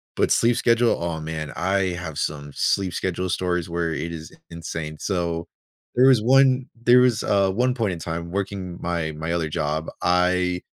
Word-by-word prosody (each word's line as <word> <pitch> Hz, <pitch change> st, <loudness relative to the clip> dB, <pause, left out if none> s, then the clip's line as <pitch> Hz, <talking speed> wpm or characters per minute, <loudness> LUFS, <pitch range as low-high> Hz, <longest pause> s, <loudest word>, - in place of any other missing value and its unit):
But -, -, +1 dB
sleep 120 Hz, +1 st, +3 dB
schedule, 115 Hz, 0 st, +3 dB
oh, 85 Hz, -2 st, -2 dB
man, 80 Hz, -1 st, -5 dB
I 95 Hz, 0 st, +1 dB
have 85 Hz, -4 st, -6 dB
some 70 Hz, -1 st, -3 dB
sleep 95 Hz, +3 st, 0 dB
schedule 90 Hz, +1 st, -2 dB
stories 90 Hz, -1 st, -1 dB
where 85 Hz, -1 st, -1 dB
it 80 Hz, +2 st, -4 dB
is 80 Hz, -1 st, -8 dB
i -, -, -18 dB
insane. 80 Hz, -2 st, -6 dB
So, 85 Hz, -3 st, -2 dB, 0.5 s
there 125 Hz, +2 st, +6 dB
was 130 Hz, -5 st, +5 dB
one 130 Hz, +2 st, +4 dB, 0.2 s
there 120 Hz, +1 st, +7 dB
was, 125 Hz, -3 st, +3 dB
uh, 100 Hz, -2 st, +2 dB
one 125 Hz, +6 st, +1 dB
point 110 Hz, -6 st, 0 dB
in 85 Hz, -, -6 dB
time 85 Hz, +1 st, -5 dB
working 95 Hz, -2 st, -4 dB
my 85 Hz, -2 st, -2 dB
my 80 Hz, +2 st, -3 dB
other 80 Hz, -2 st, -1 dB
job. 75 Hz, +1 st, -2 dB
I 90 Hz, 0 st, +2 dB
90 Hz, 185 wpm, -23 LUFS, 80-100 Hz, 0.5 s, there